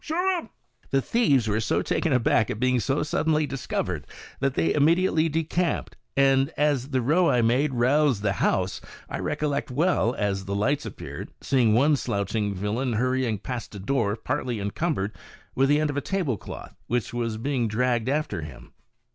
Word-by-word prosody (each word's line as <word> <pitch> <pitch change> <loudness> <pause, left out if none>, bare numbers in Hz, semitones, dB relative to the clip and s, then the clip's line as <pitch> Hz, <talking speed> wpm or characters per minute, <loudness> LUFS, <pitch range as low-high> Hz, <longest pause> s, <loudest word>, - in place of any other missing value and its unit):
shoot 315 - -3
them 360 0 +1
I" - - -22 0.4
The 135 - +2
thieves 140 - +2
were 105 +1 +1
so 110 - 0
taken 165 - 0
aback 115 -3 +3
at 105 - -3
being 125 0 +2
so 135 +5 0
suddenly 155 0 +1
discovered, 95 - -3 0.3
that 135 -1 0
they 80 0 +2
immediately 165 +1 +3
decamped, 165 +2 -1 0.2
and 135 0 +4
as 145 -3 +1
the 130 -3 0
row 165 +7 +3
I 120 -1 +3
made 130 +4 +2
roused 130 -2 +2
the 100 -2 +2
house, - - +1 0.3
I - - -5
recollect 145 -2 -1
well, 130 -3 +1
as 100 -2 -1
the 100 +1 -3
lights 135 +8 0
appeared, - - -7
seeing 120 -5 +2
one 145 +5 +4
slouching 105 -3 -1
villain 110 +6 -1
hurrying 125 -1 0
past 120 +1 -6
a - - -6
door 105 -1 0
partly 125 0 -3
encumbered 100 - -1 0.4
with 135 +1 +2
the 145 +1 +4
end 155 -1 +1
of 145 - -5
a - - +1
tablecloth, 155 - -3
which 120 -2 -1
was 115 -2 -2
being 125 0 -1
dragged 120 +2 0
after 140 - -1
him. 75 -5 -11
130 Hz, 175 wpm, -25 LUFS, 110-145 Hz, 0.4 s, and